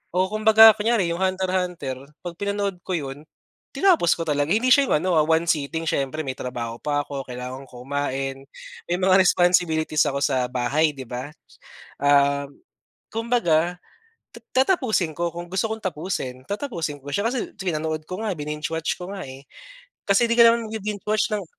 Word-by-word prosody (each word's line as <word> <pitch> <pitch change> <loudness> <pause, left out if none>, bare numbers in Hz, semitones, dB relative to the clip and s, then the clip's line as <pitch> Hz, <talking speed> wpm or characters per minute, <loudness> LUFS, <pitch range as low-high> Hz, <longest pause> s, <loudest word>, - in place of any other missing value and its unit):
oo. 185 +1 +3
Kumbaga 220 +1 +7
kunyari, 220 -1 +1
'yong 175 - -5
Hunter, 185 0 0
Hunter. 175 -8 -2 0.3
'Pag 175 -1 -5
pinanood 200 -2 -2
ko 185 - -3
'yon, 140 0 -6 0.5
tinapos 360 - +3
ko 165 - -3
talaga. 145 -1 0
Hindi 240 +6 +4
siya 280 -2 +4
'yong - - +4
ano, 185 - +1
ah, 150 - +3
one 160 +1 +2
seating. 160 0 -1
Siyempre, 150 +1 -2
may 130 - -3
trabaho 120 -2 -5
pa 145 -1 -1
ako, 140 -1 -5
kailangan 125 +2 -7
ko 125 0 -11
kumain, 135 -1 -3 0.5
may 175 - +1
mga 185 0 +3
responsibilities 175 -4 +2
ako 140 - -3
sa 130 -3 +1
bahay, 140 +5 +1
'di 130 - -6
ba? 125 +3 -6 0.7
Ah, 140 0 +3 0.7
kumbaga, 180 -8 +1 0.5
ta - - -13 0.2
tatapusin 220 - +1
ko 170 0 -1
kung 175 0 -7
gusto 190 +2 -1
kong 220 0 -4
tapusin. 150 -7 -4
Tatapusin 170 - -4
ko 145 - -11
siya 200 - 0
kasi 245 +1 -2
pinanood 155 -4 -2
ko 185 +2 -5
nga, 215 - -1
bininge-watch 150 +2 -3
ko 180 - -6
nga, 195 -2 -6
eh. 135 +1 -11 0.6
Kasi 200 +4 +4
di 235 - +3
ka 235 - +8
naman 230 -1 +2
magbi-binge-watch 210 0 -2
ng 200 - -4
165 Hz, 170 wpm, -23 LUFS, 145-200 Hz, 0.7 s, ka